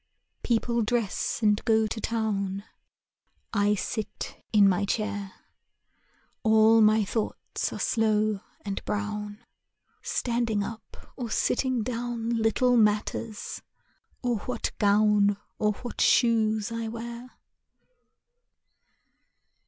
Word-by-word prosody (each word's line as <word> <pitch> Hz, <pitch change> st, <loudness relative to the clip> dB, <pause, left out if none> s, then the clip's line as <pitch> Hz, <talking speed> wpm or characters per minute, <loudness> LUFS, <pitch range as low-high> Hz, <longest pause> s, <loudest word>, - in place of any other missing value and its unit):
People 235 Hz, 0 st, +1 dB
dress 225 Hz, 0 st, -1 dB
and 210 Hz, 0 st, +3 dB
go 220 Hz, -1 st, +3 dB
to 220 Hz, +1 st, -4 dB
town; 200 Hz, -4 st, -1 dB, 0.9 s
I 205 Hz, -1 st, +3 dB
sit 215 Hz, +2 st, -5 dB
in 205 Hz, -2 st, +6 dB
my 190 Hz, +1 st, +2 dB
chair. 205 Hz, -1 st, -2 dB, 1.1 s
All 220 Hz, 0 st, +5 dB
my 215 Hz, 0 st, +5 dB
thoughts 220 Hz, +2 st, -3 dB
are -, -, -5 dB
slow 215 Hz, -2 st, +1 dB, 0.3 s
and 200 Hz, -1 st, -4 dB
brown: 210 Hz, +1 st, -4 dB, 0.6 s
Standing 235 Hz, -4 st, 0 dB
up 225 Hz, +2 st, -8 dB, 0.2 s
or 245 Hz, -3 st, -5 dB
sitting 250 Hz, +1 st, +1 dB
down 235 Hz, -1 st, -3 dB
Little 235 Hz, +2 st, +2 dB
matters, 215 Hz, 0 st, 0 dB, 0.6 s
or 240 Hz, -2 st, +1 dB
what 245 Hz, +2 st, -3 dB
gown 205 Hz, -1 st, +4 dB, 0.2 s
Or 210 Hz, 0 st, +2 dB
what 240 Hz, +3 st, -6 dB
shoes 220 Hz, -2 st, +3 dB
I 230 Hz, 0 st, -3 dB
wear. 235 Hz, +2 st, -7 dB
220 Hz, 100 wpm, -27 LUFS, 210-235 Hz, 1.1 s, in